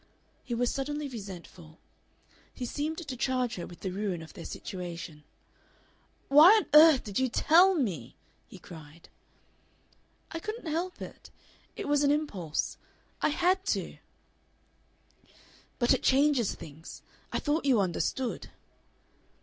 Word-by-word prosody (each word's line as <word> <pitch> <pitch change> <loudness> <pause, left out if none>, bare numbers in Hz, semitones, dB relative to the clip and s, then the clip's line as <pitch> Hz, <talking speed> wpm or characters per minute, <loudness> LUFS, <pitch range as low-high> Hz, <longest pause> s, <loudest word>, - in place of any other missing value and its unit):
He 240 - -4
was 245 +1 0
suddenly 295 +2 -3
resentful. 185 - -10 0.7
He 250 - -6
seemed 300 +6 -3
to 260 - -4
charge 250 -1 -1
her 175 - -5
with 175 - -13
the 190 - -3
ruin 190 -3 -3
of 160 - -13
their 170 - -9
situation. 170 -4 -7 1.0
"Why 300 +5 +8
on 425 - 0
earth 305 -3 +8
did 205 -1 -3
you 260 -1 +1
TELL 345 +9 +5
me?" 180 - -3 0.3
he - - -12
cried. 160 -2 -13 1.2
"I 330 - -4
couldn't 430 +3 -6
help 335 +4 -3
it. - - -11 0.5
It - - -5
was 290 0 +2
an 285 - +4
impulse. 205 - -2 0.4
I - - +3
HAD 365 +5 +1
to." - - -7 1.8
"But 240 -1 +3
it - - 0
changes 270 -4 +3
things. 155 +1 -11 0.3
I - - -1
thought 295 +1 -1
you 260 -5 +4
understood." 200 +7 -2
250 Hz, 135 wpm, -29 LUFS, 180-300 Hz, 1.8 s, Why